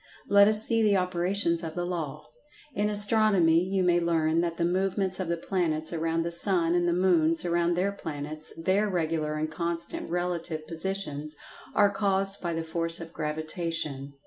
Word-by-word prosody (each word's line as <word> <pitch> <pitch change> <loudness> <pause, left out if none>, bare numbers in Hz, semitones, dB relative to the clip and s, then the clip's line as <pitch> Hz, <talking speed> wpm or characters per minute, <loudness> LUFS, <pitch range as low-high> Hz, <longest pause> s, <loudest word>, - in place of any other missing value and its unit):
Let 200 0 +6
us 215 0 +2
see 225 -1 +1
the 205 -2 +3
operations 180 -1 0
of 160 -2 -6
the 175 0 -2
Law. 155 -4 -5 0.5
In 210 +1 0
Astronomy 205 -5 +4
you 190 0 -1
may 175 -1 +3
learn 165 -1 +1
that 170 -1 -3
the 170 - 0
movements 190 +1 0
of 185 - -2
the 170 0 -1
planets 165 -3 -1
around 165 0 -1
the 170 - -3
sun 170 -1 +2
and 175 0 +1
the - - +2
moons 170 -2 +2
around 170 0 +1
their 190 +3 0
planets—their 165 +4 -2
regular 160 -4 -1
and 155 +1 -3
constant 170 +1 -3
relative 170 -2 -3
positions—are 165 +2 -2
caused 195 -1 0
by 175 - -2
the 165 0 -3
force 165 +1 +2
of 165 0 -9
Gravitation. 155 -2 -3
170 Hz, 165 wpm, -27 LUFS, 160-190 Hz, 0.5 s, Let